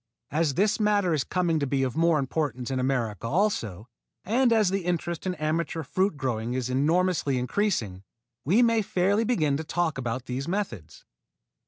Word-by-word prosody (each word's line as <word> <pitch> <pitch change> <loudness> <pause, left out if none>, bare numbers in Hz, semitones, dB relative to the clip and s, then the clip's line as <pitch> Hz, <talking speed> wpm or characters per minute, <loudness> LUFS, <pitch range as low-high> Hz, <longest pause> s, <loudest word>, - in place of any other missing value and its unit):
As 150 -2 +1
this 210 +5 +2
matter 205 -4 +2
is 145 -4 +1
coming 170 -3 0
to 140 - -1
be 135 0 0
of 130 -2 -2
more 165 0 +3
importance 135 -3 -2
in 130 - -1
America 120 -5 -1
also, 115 - -1 0.4
and 240 +4 +2
as 215 -4 +4
the 195 -1 -1
interest 170 0 -2
in 180 - -1
amateur 160 +1 -2
fruit 185 +4 0
growing 120 -3 -2
is 130 -1 -2
enormously 155 +1 +1
increasing, 125 - -1 0.4
we 200 - +4
may 230 -1 +3
fairly 200 +3 +1
begin 155 - +1
to 160 - -4
talk 165 -2 -1
about 125 0 -3
these 130 +2 -4
methods. 170 - -4
155 Hz, 170 wpm, -26 LUFS, 130-185 Hz, 0.4 s, as